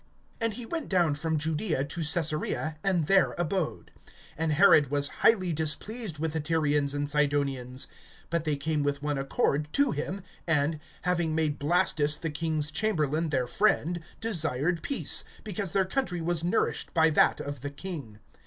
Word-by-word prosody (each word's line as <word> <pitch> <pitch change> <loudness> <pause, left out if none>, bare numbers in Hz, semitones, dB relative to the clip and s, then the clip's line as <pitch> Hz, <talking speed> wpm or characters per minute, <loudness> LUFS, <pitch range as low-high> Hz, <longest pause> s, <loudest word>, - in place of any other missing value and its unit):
And 230 -3 -1
he 240 0 -7
went 325 +6 -4
down 175 -5 +3
from 160 +2 -1
Judaea 155 0 -1
to 165 +4 -5
Caesarea, 155 0 0
and 185 -5 +1
there 195 +4 +3
abode. 165 - -2 0.5
(20)And 160 0 0
Herod 155 -4 +6
was 145 0 0
highly 185 -6 +4
displeased 165 +5 -2
with 160 +1 -2
the 160 - -1
Tyrians 150 -2 +1
and 145 0 -1
Sidonians. 140 -3 0 0.5
But 170 -2 0
they 155 -2 0
came 150 +2 -1
with 145 0 -1
one 145 -2 -1
accord 140 +2 0
to 285 -1 +3
him, 180 +6 -4 0.2
and, 155 -1 +1 0.2
having 175 -3 0
made 155 -2 0
Blastus 150 -2 +1
the 165 - -3
king's 155 -1 -1
chamberlain 160 -5 0
their 130 -4 0
friend, 175 +1 +1 0.2
desired 165 - 0
peace; 280 - +3 0.2
because 200 -3 -3
their 195 -1 +2
country 190 -3 -1
was 165 0 -1
nourished 175 - -1
by 160 -1 +5
that - - +4
of 145 -3 -5
the 145 - -4
king. 140 - -7
160 Hz, 160 wpm, -28 LUFS, 145-180 Hz, 0.5 s, Herod